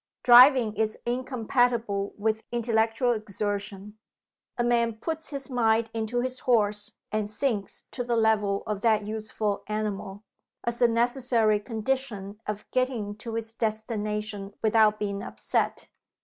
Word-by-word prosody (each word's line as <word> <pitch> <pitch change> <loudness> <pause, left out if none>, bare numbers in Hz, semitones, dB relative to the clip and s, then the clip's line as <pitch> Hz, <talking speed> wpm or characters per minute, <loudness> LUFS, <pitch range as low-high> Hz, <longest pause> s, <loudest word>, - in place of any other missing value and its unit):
Driving 245 -2 +7
is 215 0 0
incompatible 240 -4 0
with 220 +1 0
intellectual 230 +1 +1
exertion. 205 -1 -4 0.6
A 240 - +1
man 235 -1 +2
puts 320 +8 -5
his 275 -2 -6
mind 225 -3 +1
into 225 +2 -1
his 255 0 -3
horse, 210 -3 +1 0.2
and 215 -1 -1
sinks 215 -2 -2
to 245 - -3
the 240 -1 0
level 215 -3 +2
of 210 -2 -3
that 215 -2 +3
useful 215 -1 -3
animal 210 -1 -4 0.4
as 235 0 -3
a 240 - +7
necessary 235 -2 +2
condition 220 -3 -3
of 210 0 -4
getting 245 -5 -1
to 225 +1 -6
his 225 0 -2
destination 210 -2 -3
without 215 -1 +4
being 200 -1 -3
upset. - - -2
220 Hz, 130 wpm, -27 LUFS, 210-240 Hz, 0.6 s, Driving